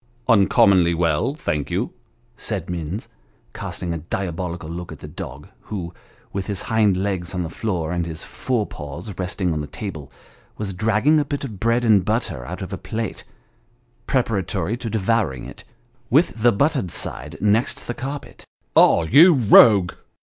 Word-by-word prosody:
" 120 Hz, -, -36 dB
Uncommonly 95 Hz, -4 st, +4 dB
well, 85 Hz, -, +1 dB
thank 75 Hz, -, -2 dB
you," -, -, -1 dB, 0.4 s
said -, -, -4 dB
Minns, 85 Hz, +4 st, -4 dB, 0.5 s
casting 85 Hz, -1 st, -4 dB
a 85 Hz, -, -3 dB
diabolical 85 Hz, 0 st, -4 dB
look 85 Hz, +2 st, -6 dB
at -, -, -8 dB
the -, -, -10 dB
dog, 70 Hz, +3 st, -8 dB, 0.2 s
who, 90 Hz, -5 st, -5 dB, 0.4 s
with, 95 Hz, -1 st, -3 dB
his 100 Hz, -4 st, -3 dB
hind 105 Hz, -4 st, +2 dB
legs 95 Hz, -2 st, -2 dB
on 90 Hz, -, -1 dB
the 80 Hz, -, -5 dB
floor, 90 Hz, -7 st, -2 dB
and 85 Hz, -1 st, -1 dB
his 80 Hz, -1 st, -6 dB
fore 120 Hz, -5 st, -2 dB
paws 75 Hz, +7 st, -8 dB
resting 90 Hz, -1 st, -1 dB
on 75 Hz, -, -2 dB
the 75 Hz, -, -5 dB
table, 80 Hz, -4 st, -7 dB, 0.5 s
was 100 Hz, -2 st, -4 dB
dragging 110 Hz, +10 st, +3 dB
a -, -, +2 dB
bit 145 Hz, 0 st, -4 dB
of 110 Hz, -8 st, -6 dB
bread 115 Hz, +3 st, +1 dB
and 105 Hz, -4 st, +5 dB
butter 105 Hz, -, -1 dB
out -, -, -5 dB
of -, -, -7 dB
a -, -, -4 dB
plate, 110 Hz, -2 st, -4 dB, 0.8 s
preparatory 110 Hz, -4 st, 0 dB
to 120 Hz, -1 st, -5 dB
devouring 110 Hz, -, 0 dB
it, -, -, -10 dB, 0.5 s
with 135 Hz, -4 st, +2 dB
the 120 Hz, +1 st, +6 dB
buttered 135 Hz, -, +1 dB
side -, -, -3 dB
next 105 Hz, +3 st, +1 dB
the 120 Hz, -, -3 dB
carpet. 140 Hz, +2 st, -7 dB, 0.2 s
" -, -, -45 dB
Ah, 85 Hz, -, +6 dB
you 150 Hz, -, +7 dB
rogue 105 Hz, -6 st, +7 dB
100 Hz, 170 wpm, -22 LUFS, 85-115 Hz, 0.8 s, you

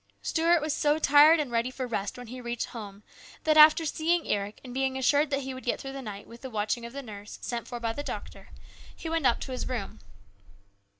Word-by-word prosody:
Stuart 335 Hz, 0 st, +2 dB
was 305 Hz, -1 st, 0 dB
so 295 Hz, 0 st, +2 dB
tired 305 Hz, +2 st, +6 dB
and 285 Hz, -5 st, -2 dB
ready 235 Hz, +1 st, +1 dB
for 255 Hz, 0 st, -5 dB
rest 205 Hz, -4 st, -3 dB
when 245 Hz, -, -8 dB
he 250 Hz, +2 st, -8 dB
reached 240 Hz, -1 st, -3 dB
home 205 Hz, -3 st, -9 dB, 0.4 s
that, 310 Hz, -1 st, +3 dB
after 310 Hz, +1 st, +8 dB
seeing 325 Hz, +2 st, 0 dB
Eric 205 Hz, 0 st, -2 dB
and 250 Hz, -2 st, -9 dB
being 265 Hz, 0 st, 0 dB
assured 285 Hz, +3 st, +3 dB
that 275 Hz, -1 st, 0 dB
he 265 Hz, 0 st, -5 dB
would 260 Hz, -, -9 dB
get 245 Hz, -, -1 dB
through 270 Hz, 0 st, -7 dB
the 275 Hz, -, -6 dB
night 205 Hz, -4 st, -7 dB
with 235 Hz, +1 st, -13 dB
the 265 Hz, -, -6 dB
watching 220 Hz, +2 st, -2 dB
of 235 Hz, -, -13 dB
the 280 Hz, 0 st, -6 dB
nurse, 205 Hz, -3 st, -9 dB
sent 235 Hz, -1 st, -4 dB
for 240 Hz, -, -6 dB
by 230 Hz, -1 st, -2 dB
the 290 Hz, -, -4 dB
doctor, -, -, -7 dB, 0.5 s
he 325 Hz, -, -6 dB
went 325 Hz, -5 st, +2 dB
up 240 Hz, -, +2 dB
to 265 Hz, -, -5 dB
his 255 Hz, -, -4 dB
room. 220 Hz, -, -4 dB
255 Hz, 235 wpm, -28 LUFS, 235-295 Hz, 0.5 s, after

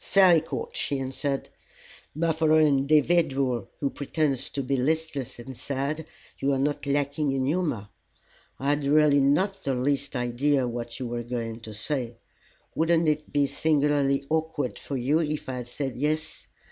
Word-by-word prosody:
"Fairly 185 Hz, -5 st, +5 dB
caught," 465 Hz, -, -5 dB
she 140 Hz, -, -1 dB
answered. 135 Hz, +1 st, -2 dB, 0.9 s
"For 160 Hz, -1 st, +3 dB
an 155 Hz, -, +6 dB
individual 140 Hz, -, +2 dB
who 140 Hz, -, -1 dB
pretends 145 Hz, -2 st, -1 dB
to 140 Hz, -, -3 dB
be 135 Hz, +2 st, 0 dB
listless 145 Hz, 0 st, -1 dB
and 130 Hz, +2 st, -9 dB
sad 140 Hz, +5 st, -3 dB, 0.3 s
you 140 Hz, +1 st, +1 dB
are -, -, +1 dB
not 145 Hz, +1 st, -1 dB
lacking 140 Hz, 0 st, 0 dB
in 135 Hz, -1 st, 0 dB
humor. 150 Hz, -, -1 dB, 0.7 s
I 140 Hz, -, -1 dB
had 145 Hz, 0 st, +1 dB
really 145 Hz, 0 st, +5 dB
not 185 Hz, +9 st, +2 dB
the 135 Hz, -1 st, 0 dB
least 140 Hz, +2 st, -1 dB
idea 125 Hz, +2 st, +1 dB
what 120 Hz, 0 st, -5 dB
you 130 Hz, -, -3 dB
were 120 Hz, 0 st, -3 dB
going 115 Hz, -1 st, -4 dB
to 110 Hz, -2 st, -8 dB
say. 120 Hz, +1 st, -2 dB, 0.6 s
Wouldn't 165 Hz, 0 st, +2 dB
it 150 Hz, 0 st, 0 dB
be 145 Hz, -1 st, +3 dB
singularly 140 Hz, -1 st, +1 dB
awkward 155 Hz, -4 st, -1 dB
for 140 Hz, -, -4 dB
you 135 Hz, +6 st, +2 dB
if 155 Hz, -2 st, -2 dB
I 130 Hz, -1 st, -3 dB
had 125 Hz, -1 st, -6 dB
said 135 Hz, +1 st, -4 dB
'Yes'? 155 Hz, +4 st, -2 dB
140 Hz, 160 wpm, -26 LUFS, 130-155 Hz, 0.9 s, an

